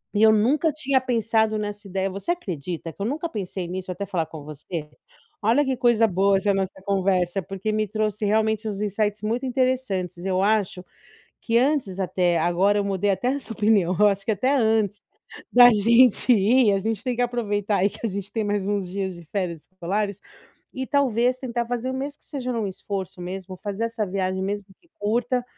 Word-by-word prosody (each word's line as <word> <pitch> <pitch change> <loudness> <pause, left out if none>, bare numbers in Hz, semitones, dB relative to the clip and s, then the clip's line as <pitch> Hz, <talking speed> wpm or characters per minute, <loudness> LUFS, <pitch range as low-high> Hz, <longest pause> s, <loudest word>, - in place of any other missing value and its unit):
E 210 - +3
eu 220 - +8
nunca 270 +9 +3
tinha 275 -3 +1
pensado 225 -3 +1
nessa 205 -1 -5
ideia 190 0 -1
você 195 - -3
acredita 175 - -4
que - - -26
eu 200 - 0
nunca 305 +7 -2
pensei 190 - -4
nisso 185 +1 -5
até 200 +3 -4
falar 170 -4 -1
com 155 -1 -10
você? 150 +1 -6 0.5
Olha 230 +8 +3
que 265 -2 -1
coisa 235 -2 +4
boa 195 +1 +3
essa 200 +1 +1
nossa 190 0 -3
conversa, 190 -1 +1
porque 195 +4 -3
me 215 0 0
trouxe 215 0 -1
realmente 220 +1 +1
uns 205 -1 -4
insights 210 0 -1
muito 230 +5 -1
interessantes. 250 -9 -1
Eu 190 0 +1
acho 200 -3 +1 0.6
que 230 - 0
antes 250 -8 0
até 180 -2 +1
agora 180 +5 +2
eu 205 - 0
mudei 200 0 0
até 190 +6 0
essa 265 -3 -2
opinião, 205 -4 +2
eu 210 - +7
acho 195 -1 -1
que 225 - +1
até 255 +8 +1
antes, 220 -4 +1 0.5
da 245 0 +9
gente 235 +3 +5
ir, 225 +1 +4
a 195 - +1
gente 220 +2 -3
tem 250 -2 0
que 245 - +1
aproveitar 210 -4 -1
aí 195 +3 +2
que - - -12
a - - +2
gente 200 0 -6
tem 225 - -1
mais 205 -1 -1
uns 200 -3 -1
dias 190 0 -3
de 170 -1 -12
férias 175 -6 -3
escolares, 200 +2 -2 0.5
e 260 0 -4
talvez 255 -3 +2
tentar 240 -2 -3
fazer, 245 +2 -2
mesmo 280 +2 -4
que - - -16
seja 260 -4 -4
num 225 -3 -1
esforço 190 -1 -5
mesmo, 185 +1 -6
fazer 205 +2 -3
essa 230 -2 -2
viagem, 190 0 -2
mesmo 205 +1 -3
que 340 - -30
curta, 240 +4 0
205 Hz, 195 wpm, -24 LUFS, 190-235 Hz, 0.6 s, da